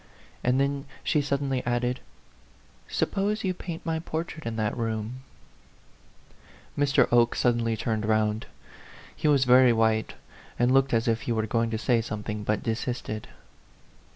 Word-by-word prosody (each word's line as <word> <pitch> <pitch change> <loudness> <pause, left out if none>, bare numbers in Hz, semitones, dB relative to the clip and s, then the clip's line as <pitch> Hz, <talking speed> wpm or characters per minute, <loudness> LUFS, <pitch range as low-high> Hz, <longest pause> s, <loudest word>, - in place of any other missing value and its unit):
And 125 +2 +2
then 140 0 0 0.2
she 150 - +2
suddenly 140 -2 -1
added, 120 +1 0 0.9
"Suppose 210 +2 -1
you 185 -2 0
paint 170 -2 -7
my 160 -1 -1
portrait 160 -2 -5
in 115 - -3
that 110 -1 -1
room 115 +1 -3 0.8
?" - - -27
Mr. 140 -3 +3
Oke 120 -1 +4
suddenly 115 -2 +1
turned 110 -1 -1
round. 110 0 +1 0.7
He - - -1
was 140 -3 +4
very 125 0 +7
white, 110 -1 +1 0.4
and 120 +1 +3
looked 135 0 +4
as 115 +1 +1
if 115 0 +1
he - - -3
were 110 -1 0
going 115 +1 0
to 110 - -2
say 115 +1 +2
something, 105 -1 -5
but 105 0 -1
desisted. 115 -1 -3
120 Hz, 150 wpm, -27 LUFS, 110-140 Hz, 0.9 s, very